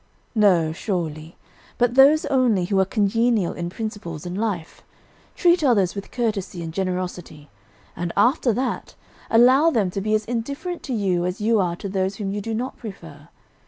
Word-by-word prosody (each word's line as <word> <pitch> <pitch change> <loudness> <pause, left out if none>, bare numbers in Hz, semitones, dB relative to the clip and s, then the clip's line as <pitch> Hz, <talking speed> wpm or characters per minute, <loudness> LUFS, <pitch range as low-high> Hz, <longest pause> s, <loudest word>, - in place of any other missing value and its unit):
"No, 185 -8 +3
surely; 160 -3 -4 0.4
but 240 -1 +2
those 280 +4 +6
only 245 -9 +2
who 195 +1 +1
are 190 - +4
congenial 215 0 +1
in 170 0 -4
principles 180 -6 -6
and 175 +1 -5
life. 195 -6 -3 0.5
Treat 350 -2 +3
others 205 -10 +3
with 200 -1 -7
courtesy 205 -7 -3
and 160 -1 -6
generosity, 180 -5 -4 0.4
and 175 -1 -3
after 250 0 +3
that, 255 +4 -3 0.3
allow 255 +7 +5
them 210 - 0
to 195 - -3
be 215 +2 +1
as 215 0 -1
indifferent 280 - -4
to 265 - -3
you 185 -5 0
as 180 - -4
you 220 +1 +2
are 175 -3 0
to 200 - -7
those 190 0 -1
whom 195 -1 -4
you 205 +1 -3
do 225 +2 -3
not 250 +4 -4
prefer. 210 -5 -10
205 Hz, 170 wpm, -23 LUFS, 180-240 Hz, 0.5 s, those